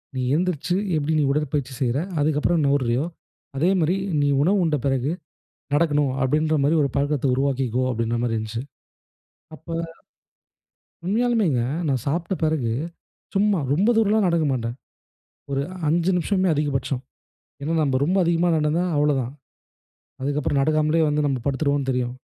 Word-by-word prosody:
நீ 130 - -1
எந்திரிச்சு 180 0 0 0.2
எப்படி 155 +1 0
நீ 150 - +3
உடற்பயிற்சி 140 -2 -1
செய்ற, 125 0 +1 0.2
அதுக்கப்புறம் 155 +2 +1
நவுர்றியோ! 135 -1 +1 0.5
அதே 165 +6 +3
மாதிரி 165 +4 +2 0.3
நீ 145 - +2 0.2
உணவு 195 +5 +3
உண்ட 155 -2 +1
பிறகு 135 +2 +1 0.6
நடக்கணும் 145 -3 +2
அப்படிங்கிற 155 +4 +2
மாதிரி 150 +4 +3
ஒரு 140 - 0
பழக்கத்தை 145 -1 0
உருவாக்கிக்கோ 130 -2 0
அப்படிங்கிற 115 0 -1
மாதிரி 115 -2 0
இருந்துச்சு. 110 +2 -4 1.0
அப்ப 160 +2 -14 1.3
...உண்மையாலுமேங்க! 210 - +1 0.3
நான் 130 -4 0
சாப்பிட்ட 170 +6 -1
பிறகு 150 -8 0 0.6
சும்மா, 200 -1 +2 0.2
ரொம்ப 195 +7 +2
தூரம்லாம் 215 -2 +3
நடக்க 170 -2 +2
மாட்டேன். 120 -1 -3 0.7
ஒரு 140 0 0 0.3
5 170 +3 +2
நிமிஷமே 185 +2 +1
அதிகபட்சம். 140 -3 -1 0.6
ஏன்னா 160 +3 -1
நம்ம 135 -3 +1
ரொம்ப 180 +6 +1
அதிகமா 170 +1 +2
நடந்தா 155 +3 +1
அவ்வளோதான். 140 -4 +1 0.9
அதுக்கு 145 +2 -1
அப்புறம் 140 0 0
நடக்காமலேயே 155 +2 +2
வந்து 150 0 +1
நம்ம 135 -2 -1
படுத்துருவோம்னு 140 0 0
தெரியும். 125 -1 -2
145 Hz, 135 wpm, -23 LUFS, 135-165 Hz, 1.3 s, நீ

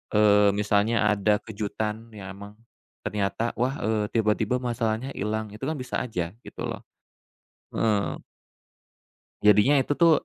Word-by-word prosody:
eee, 105 -1 +6
misalnya 105 +2 +2 0.2
ada 105 0 +2
kejutan 110 +1 -4
ya 95 -2 -8
emang, 100 +1 -10 0.5
ternyata 105 +3 -1
wah, 130 +3 +1
eee, 110 -1 +1
tiba-tiba 110 +1 +2
masalahnya 120 0 -1
ilang 110 +1 -2
itu 110 - -11
kan - - 0
bisa 130 -1 -3
aja 90 -8 -3 0.2
gitu - - -9
loh, - - -5 0.9
heeh. 105 -3 +1 1.2
Jadinya 105 +7 +5
itu 145 - 0
tuh 170 -1 +6
105 Hz, 130 wpm, -26 LUFS, 105-115 Hz, 1.2 s, eee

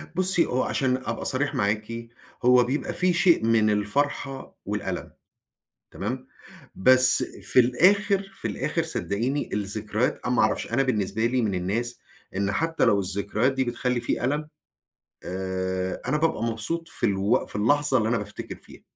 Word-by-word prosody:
بُصّي 185 -1 +2
هو 130 +1 0
عشان 130 -2 0
أبقى 115 -3 -5
صريح 145 +2 -1
معاكِ، 110 +3 -2 0.4
هو 125 0 +6
بيبقى 130 +5 -2
في 180 -1 +2
شيء 170 -9 +3
من 110 -2 +3
الفرحة 135 +6 -1
والألم، - - -4 0.8
تمام؟ 130 +6 -5 0.5
بس 130 +4 +6
في 125 - +3
الآخر، 195 - +3
في - - -2
الآخر - - -2
صدقيني 125 +8 -2
الذكريات 105 +3 -2
أنا 125 - +1
ما - - +3
أعرفش 110 +1 0
أنا 135 +3 +3
بالنسبة 110 -2 0
لي 125 0 +1
من 100 -3 0
الناس 110 +7 -2 0.4
إن 100 0 0
حتى 165 +8 0
لو 105 -4 +3
الذكريات 100 +6 -1
دي 130 0 0
بتخلّي 125 0 -1
في 120 - -2
ألم، 150 +3 -1 0.8
آآ، 95 0 -3
أنا 150 - +2
بابقى 160 -8 0
مبسوط 115 +9 -3
في - - 0
الوق 100 +5 +1
في - - -4
اللحظة 135 +5 +2
اللي 110 0 0
أنا 115 - +1
بافتكر 105 0 -6
فيها، - - -15
120 Hz, 155 wpm, -25 LUFS, 105-135 Hz, 0.8 s, هو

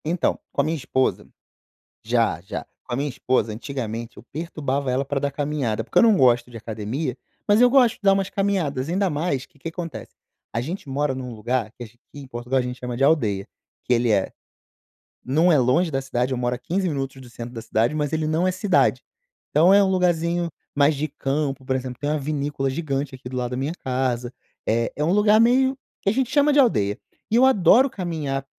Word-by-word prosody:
Então, 170 +3 0
com - - +1
a - - -1
minha 160 - -1
esposa, 130 -2 -1 0.8
já, 115 -7 +1
já, 100 +4 -6 0.2
com 125 - -9
a - - 0
minha 140 +3 -1
esposa 125 -4 0
antigamente 115 -1 -5
eu - - -11
perturbava 145 -4 -2
ela 130 +2 0
pra 140 0 -2
dar 140 - 0
caminhada, 140 -6 -2
porque - - -18
eu - - +7
não 225 -3 +6
gosto 120 -4 +3
de 120 - -10
academia, 115 +5 -4 0.3
mas 205 +2 +5
eu 245 0 +6
gosto 250 -3 +5
de - - -32
dar 195 -1 +5
umas 195 -1 0
caminhadas, 170 -10 -1
ainda 190 +3 +1
mais 145 -4 -2
que 160 - -28
que 165 - -6
acontece, 165 -1 -7 0.4
a 115 - -1
gente 155 +5 -5
mora 140 0 0
num 125 -2 -6
lugar 115 +1 -2
que 120 - -9
aqui 120 +1 -16 0.2
em 145 -1 -9
Portugal 125 +1 -2
a - - +2
gente 125 0 -5
chama 125 -1 -5
de 135 - +2
aldeia, 110 -11 +2 0.4
que 125 - +2
ele 120 0 +2
é, 100 -3 +1 0.9
não 160 +7 +3
é 150 - +5
longe 145 +8 +2
da 135 -1 -1
cidade, 130 -1 -1
eu 130 - -1
moro 125 0 0
a - - -7
15 180 +9 -2
minutos 135 -4 -3
do 125 - -13
centro 120 +1 -8
da 115 - -6
cidade, 115 +3 0
mas 150 0 -1
ele 155 -1 0
não 160 +4 +1
é - - +2
cidade. 190 +2 +2 0.5
Então 170 +6 +5
é 200 0 +6
um 195 - +1
lugarzinho 175 -2 +1 0.3
mais 145 +1 +4
de 150 +3 -2
campo, 135 -1 -2
por 130 - 0
exemplo, 130 -1 -4
tem 145 - -2
uma 155 0 0
vinícola 145 -1 -2
gigante 140 -1 -3
aqui 130 -1 -10
do 130 - -6
lado 125 -1 -2
da 125 - -3
minha 140 +5 -2
casa, 125 -5 -2 0.4
eh, 115 +1 +1
é 150 - -1
um 160 - +2
lugar 210 +1 +5
meio 260 +3 +3 0.2
que - - +1
a - - +1
gente 255 0 0
chama 290 +1 +3
de 290 - +4
aldeia. 105 - +3 0.3
E - - +3
eu 250 +2 +6
adoro 255 +2 +5
caminhar 155 - -3
140 Hz, 220 wpm, -23 LUFS, 125-170 Hz, 0.9 s, eu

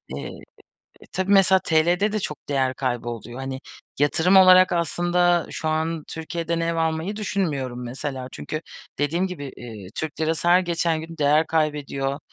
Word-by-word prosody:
Eee, - - -5 0.8
e - - -15
e - - -17
tabii 190 +1 0
mesela 190 -1 +6
TL'de 175 +6 +2
de 215 - 0
çok 150 -6 -6
değer 135 -2 +1
kaybı 120 -3 -2
oluyor. 120 +1 -7
Hani 135 0 -5 0.4
yatırım 160 +6 +3
olarak 185 -1 +7
aslında 175 +1 +1
şu 160 - -3
an, 160 0 -1
Türkiye'den 165 +1 -3
ev 165 0 -1
almayı 165 +4 -1
düşünmüyorum 145 - -2
mesela. 130 +1 -5
Çünkü 155 - -5 0.4
dediğim 165 +6 +1
gibi, 145 -8 -7
iii, 110 -6 -9
Türk 160 -1 -5
lirası 160 +2 0
her 180 +1 +6
geçen 170 -2 0
gün 165 +1 -9
değer 150 +2 +3
kaybediyor. 145 -3 -1
160 Hz, 160 wpm, -23 LUFS, 140-175 Hz, 0.8 s, olarak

